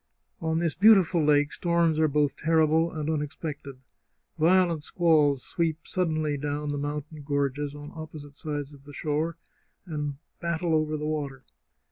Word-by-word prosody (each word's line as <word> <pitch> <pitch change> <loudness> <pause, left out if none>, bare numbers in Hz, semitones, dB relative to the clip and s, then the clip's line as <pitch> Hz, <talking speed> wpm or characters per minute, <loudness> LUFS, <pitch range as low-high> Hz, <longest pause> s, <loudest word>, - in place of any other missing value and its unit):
On 160 0 0
this 165 -2 +1
beautiful 190 -5 +5
lake 145 0 +3
storms 170 -2 +1
are 160 - +4
both 145 -1 +1
terrible 160 +1 +2
and 155 -2 -4
unexpected. 150 -2 -4 0.6
Violent 170 -1 +3
squalls 150 -6 +3
sweep 165 -2 -2
suddenly 155 -5 0
down 145 +1 -3
the 145 - -2
mountain 150 +1 -5
gorges 145 0 -1
on 145 0 -9
opposite 155 -3 -9
sides 145 -2 -4
of 140 -1 -16
the 145 - -11
shore, 155 +3 -1 0.5
and 150 -4 -3 0.2
battle 170 0 -1
over 155 0 +1
the 150 - -4
water. 145 -4 -3
155 Hz, 145 wpm, -27 LUFS, 145-165 Hz, 0.6 s, beautiful